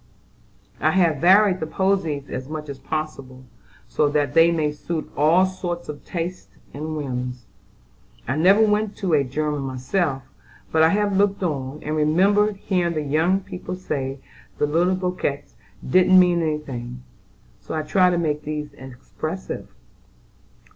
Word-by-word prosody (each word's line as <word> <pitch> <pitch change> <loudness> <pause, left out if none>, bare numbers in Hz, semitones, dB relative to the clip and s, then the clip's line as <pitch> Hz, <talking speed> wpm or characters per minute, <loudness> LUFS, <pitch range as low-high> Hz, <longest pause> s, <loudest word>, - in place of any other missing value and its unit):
I - - +3
have 170 -5 +3
varied 185 +4 +5
the 160 - -3
posies 165 -5 0
as 130 +2 -6
much 155 -1 -6
as 140 -1 -7
possible, 135 -5 -5 0.4
so 150 - +1
that 145 -1 0
they 165 0 +6
may 155 -3 0
suit 155 +2 -5
all 160 +6 +4
sorts 175 -3 -5
of 150 - -7
tastes 175 +1 -5 0.2
and 155 +2 -4
whims. 125 -4 -4 0.8
I 130 - 0
never 190 +7 +5
went 210 -1 +1
to 185 -5 -1
a 145 -2 +4
'German' 150 +2 -2
myself; 135 +2 -2 0.5
but 160 - +3
I 160 - +6
have 205 +1 +1
looked 200 -1 +1
on, 145 -3 -3
and 155 +1 -2
remember 195 +8 +3
hearing 180 -3 -1
the 155 - -1
young 160 +7 +1
people 185 -1 -7
say 135 -7 -4 0.4
the - - +2
little 170 +5 +2
bouquets 180 -6 -3 0.3
didn't 185 +5 +6
mean 175 -1 +4
any 155 -2 0
thing, 125 -4 -7 0.6
so - - -6
I 155 - -1
tried 180 +3 +3
to 175 - 0
make 150 -3 -1
these 150 -1 -5
expressive." 135 +7 -7
155 Hz, 155 wpm, -23 LUFS, 145-185 Hz, 0.8 s, they